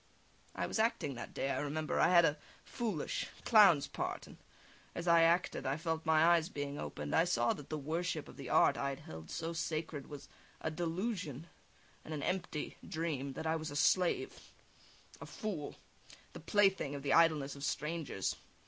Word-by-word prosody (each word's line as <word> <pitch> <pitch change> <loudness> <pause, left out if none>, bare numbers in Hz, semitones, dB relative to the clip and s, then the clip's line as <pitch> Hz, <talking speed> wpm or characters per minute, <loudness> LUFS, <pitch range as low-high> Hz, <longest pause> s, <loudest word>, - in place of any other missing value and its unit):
I - - -1
was - - -3
acting 220 -10 +1
that 120 - -7
day, 135 - -2
I - - -1
remember 155 +2 -2
I - - +6
had 170 -1 +6
a 150 -1 +1 0.3
foolish, 215 - -3 0.2
clown's 195 - +7
part, - - -4
and - - -14 0.6
as 175 0 -4
I 170 -1 +6
acted, 165 -4 +2
I 135 +2 0
felt 160 0 -3
my 160 0 +5
eyes 170 -1 +4
being 145 0 -4
opened; 75 0 -5
I 165 - +5
saw 120 -9 +2
that 145 - -10
the 155 - -2
worship 160 +2 -2
of - - -12
the - - -8
art - - +4
I 140 - -1
had 135 - -6
held 80 0 -10
so 165 0 -3
sacred 155 -3 -3
was 145 -2 -9 0.3
a 160 - -3
delusion 170 - -3 0.6
and 155 - -5
an 145 - -4
empty 175 -5 -3
dream; 150 -4 -3
that 160 - -6
I 160 0 +1
was 160 -1 -4
a 145 - -7
slave, 180 +4 +1 0.7
a - - -7
fool, 185 -10 -5 0.6
the - - -8
plaything 195 -8 +2
of 140 - -6
the 140 -2 +1
idleness 155 -4 +4
of 140 - -9
strangers. 150 - -2
155 Hz, 185 wpm, -34 LUFS, 145-170 Hz, 0.7 s, clown's